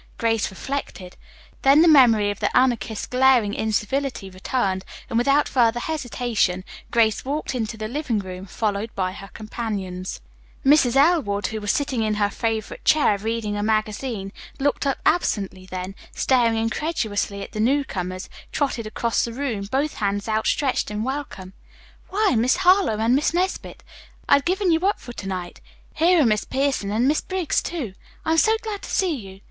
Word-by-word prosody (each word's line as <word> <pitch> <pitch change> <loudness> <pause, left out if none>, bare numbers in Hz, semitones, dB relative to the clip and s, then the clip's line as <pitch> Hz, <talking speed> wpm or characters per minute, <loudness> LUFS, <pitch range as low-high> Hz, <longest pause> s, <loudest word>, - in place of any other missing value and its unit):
Grace 225 -2 +1
reflected. 190 -4 -6 0.5
Then 280 +4 +6
the - - +5
memory 230 -9 +6
of 205 - -7
the - - +1
Anarchist's 240 -4 +1
glaring 250 -5 +3
incivility 220 0 -2
returned, 190 0 -1 0.3
and - - -2
without 275 +5 +3
further 240 -2 +2
hesitation 240 - -1 0.3
Grace 220 -2 +2
walked 290 +3 -3
into 225 -3 -3
the 215 0 -4
living 260 -1 -2
room, 190 -1 -6
followed 210 +2 -2
by 185 -1 -1
her 195 +1 -9
companions. 200 -4 -5 0.5
Mrs. 270 -3 +5
Elwood, 270 - +3
who 220 +1 -3
was 205 - +1
sitting 275 -5 -1
in 215 -1 0
her 205 -1 +1
favorite 220 0 -3
chair 300 -9 +4
reading 220 0 -2
a 205 - -2
magazine, 215 -1 -1 0.3
looked 285 +1 0
up 275 - 0
absently, 195 - 0
then, 185 +1 -5 0.2
staring 235 -4 +2
incredulously 225 -5 -2
at - - -10
the 215 - -6
newcomers, 210 -8 -1 0.2
trotted 255 -6 -1
across 230 +2 0
the 235 - -3
room, 230 -6 -3
both 285 +3 0
hands 205 -1 -1
outstretched 220 +5 0
in 210 +1 -3
welcome. 255 -8 -5 0.6
"Why, 410 +1 +2
Miss 240 +3 +3
Harlowe 365 - +5
and 225 +3 +2
Miss 300 +4 +1
Nesbit, 370 +2 -2 0.4
I - - +5
had 280 - -4
given 370 +1 +1
you 325 - +3
up 395 +4 +1
for 240 - -9
to 200 - -7
night. 180 -2 -5 0.3
Here 335 0 +4
are - - +2
Miss 215 -3 +2
Pierson 270 -6 -1
and 225 +5 +1
Miss 300 +2 +2
Briggs, 370 -4 -1
too. 285 - -4 0.3
I'm 320 +1 +3
so 445 +4 +4
glad 420 -3 -4
to - - -9
see 370 -4 +1
you. 195 -6 -10
230 Hz, 170 wpm, -23 LUFS, 205-280 Hz, 0.6 s, Then